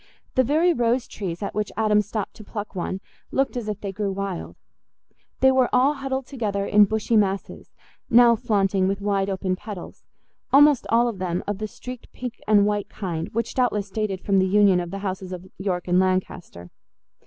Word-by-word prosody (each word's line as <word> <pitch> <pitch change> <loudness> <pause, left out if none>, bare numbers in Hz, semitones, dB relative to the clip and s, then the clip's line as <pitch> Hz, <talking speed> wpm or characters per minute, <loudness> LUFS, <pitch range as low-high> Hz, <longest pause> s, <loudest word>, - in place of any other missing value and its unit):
The 260 - +4
very 315 +7 +3
rose 240 -2 +1
trees 185 -2 -5
at 200 - -4
which 210 -1 -2
Adam 210 -1 +3
stopped 210 0 -4
to 215 - -10
pluck 205 0 -6
one 185 +1 -3 0.3
looked 270 -1 0
as 235 -3 -3
if 210 - -4
they 200 - -4
grew 200 0 -2
wild; 195 -2 -4 0.9
they 265 - +6
were 260 -1 +3
all 260 +4 +4
huddled 270 -2 -3
together 210 -7 -2
in 210 0 +6
bushy 220 +3 -1
masses, 195 -2 -1 0.3
now 235 0 +7
flaunting 195 -3 +1
with 195 +1 -1
wide 200 -1 0
open 190 -1 -1
petals, 200 -2 -9 0.5
almost 290 -1 +6
all 235 +1 +4
of 220 -5 -4
them 180 -1 -2
of 205 -1 -3
the 215 - -3
streaked 250 +3 -10
pink 250 -1 -6
and 205 -1 +5
white 205 -1 -1
kind, 170 -5 -4
which 230 +1 -2
doubtless 210 -6 0
dated 200 -3 -2
from 195 -1 +2
the 190 - +3
union 200 -1 +4
of 175 -1 -4
the 195 - -5
houses 190 -1 -4
of 180 0 -7
York 185 -2 -2
and 180 +1 +3
Lancaster. 185 - -2
205 Hz, 190 wpm, -24 LUFS, 190-235 Hz, 0.9 s, now